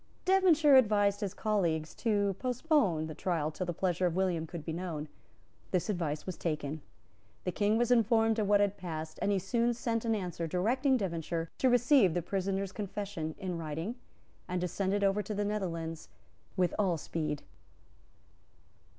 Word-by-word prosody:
Devonshire 335 Hz, -7 st, +6 dB
advised 205 Hz, -4 st, +3 dB
his 200 Hz, -1 st, -3 dB
colleagues 170 Hz, -8 st, 0 dB
to 205 Hz, -3 st, +1 dB
postpone 250 Hz, -, +1 dB
the 160 Hz, -, -6 dB
trial 160 Hz, -2 st, -1 dB
till 185 Hz, +3 st, -4 dB
the -, -, 0 dB
pleasure 180 Hz, +1 st, 0 dB
of 170 Hz, -, -2 dB
William 180 Hz, -4 st, 0 dB
could 170 Hz, -2 st, -7 dB
be 160 Hz, -, -3 dB
known. 165 Hz, -3 st, -4 dB, 0.6 s
This 185 Hz, +3 st, 0 dB
advice 160 Hz, -6 st, -2 dB
was 185 Hz, -, -5 dB
taken. 155 Hz, -2 st, -3 dB, 0.6 s
The 180 Hz, -, -1 dB
King 210 Hz, +3 st, +2 dB
was 240 Hz, +1 st, +1 dB
informed 225 Hz, -1 st, +3 dB
of 210 Hz, -, +1 dB
what 205 Hz, 0 st, +5 dB
had 205 Hz, 0 st, +1 dB
passed; 160 Hz, -4 st, -6 dB
and 205 Hz, -, +1 dB
he 200 Hz, -, +2 dB
soon 235 Hz, +5 st, +1 dB
sent 230 Hz, -1 st, -1 dB
an 225 Hz, -1 st, +1 dB
answer 175 Hz, -4 st, -3 dB
directing 250 Hz, -, +2 dB
Devonshire 165 Hz, -4 st, -3 dB
to 260 Hz, -, +4 dB
receive 245 Hz, -, +4 dB
the 175 Hz, -, 0 dB
prisoner's 195 Hz, +1 st, -2 dB
confession 195 Hz, -6 st, -4 dB
in 185 Hz, -4 st, -4 dB
writing, 160 Hz, +7 st, -4 dB, 0.5 s
and 180 Hz, 0 st, -1 dB
to 180 Hz, -, 0 dB
send 190 Hz, +2 st, -1 dB
it 200 Hz, 0 st, +1 dB
over 195 Hz, +1 st, +2 dB
to 210 Hz, +1 st, -5 dB
the 205 Hz, +1 st, 0 dB
Netherlands 165 Hz, -6 st, -3 dB, 0.5 s
with 180 Hz, -2 st, +2 dB
all 185 Hz, -5 st, +2 dB
speed. 150 Hz, -1 st, -3 dB
190 Hz, 170 wpm, -31 LUFS, 165-215 Hz, 0.6 s, Devonshire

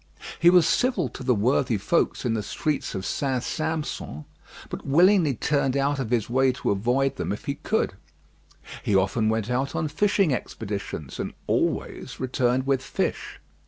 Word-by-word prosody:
He 170 Hz, -, +7 dB
was 180 Hz, -2 st, +6 dB
civil 250 Hz, +9 st, +1 dB
to -, -, -10 dB
the 125 Hz, -1 st, +2 dB
worthy 120 Hz, +2 st, +2 dB
folks 135 Hz, -, 0 dB
in 120 Hz, -, +1 dB
the 110 Hz, -, -1 dB
streets 145 Hz, +7 st, -2 dB
of 95 Hz, 0 st, -4 dB
St. 130 Hz, -3 st, -1 dB
Sampson, 155 Hz, -, -3 dB, 0.4 s
but -, -, -6 dB
willingly 165 Hz, 0 st, +4 dB
turned 140 Hz, +1 st, +1 dB
out 140 Hz, +1 st, +1 dB
of 130 Hz, -5 st, -2 dB
his 115 Hz, -3 st, +1 dB
way 130 Hz, +2 st, +3 dB
to -, -, -1 dB
avoid 125 Hz, +7 st, +1 dB
them -, -, -2 dB
if 105 Hz, -, -5 dB
he 140 Hz, -, -1 dB
could. -, -, -1 dB, 0.9 s
He 100 Hz, -, 0 dB
often 100 Hz, +4 st, +2 dB
went 110 Hz, +1 st, -1 dB
out 130 Hz, +3 st, -1 dB
on 155 Hz, -, 0 dB
fishing 195 Hz, 0 st, +2 dB
expeditions, 100 Hz, -, -5 dB
and -, -, -4 dB
always -, -, -1 dB
returned 130 Hz, 0 st, +1 dB
with 135 Hz, -1 st, +1 dB
fish. 135 Hz, -, -3 dB
130 Hz, 165 wpm, -25 LUFS, 115-150 Hz, 0.9 s, He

